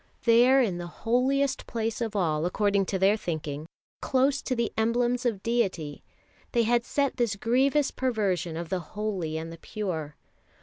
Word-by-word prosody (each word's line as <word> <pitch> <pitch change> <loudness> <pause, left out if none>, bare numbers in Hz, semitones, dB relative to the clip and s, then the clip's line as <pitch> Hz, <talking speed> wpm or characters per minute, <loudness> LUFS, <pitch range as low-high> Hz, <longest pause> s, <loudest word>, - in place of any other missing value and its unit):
There 245 +3 +6
in 185 -7 -1
the 175 - -5 0.2
holiest 260 +3 +1
place 225 -1 -2
of 220 -2 -2
all, 160 -4 +1
according 200 +1 +1
to 195 - -1
their 195 +2 +4
thinking, 155 -6 -4 0.3
close 270 +1 +2
to 255 - -2
the 235 -2 -1
emblems 240 +2 +1
of 205 -5 -2
deity, 185 -11 -1 0.5
they 235 -2 +3
had 235 +1 +2
set 280 +1 -1
this 235 -4 +1
grievous 265 +7 +2
perversion 195 -10 -1
of 170 -1 -5
the 185 - 0
holy 185 -5 -3
and 165 +1 -5
the 165 - -12
pure. 160 -9 -4
215 Hz, 165 wpm, -27 LUFS, 175-245 Hz, 0.5 s, There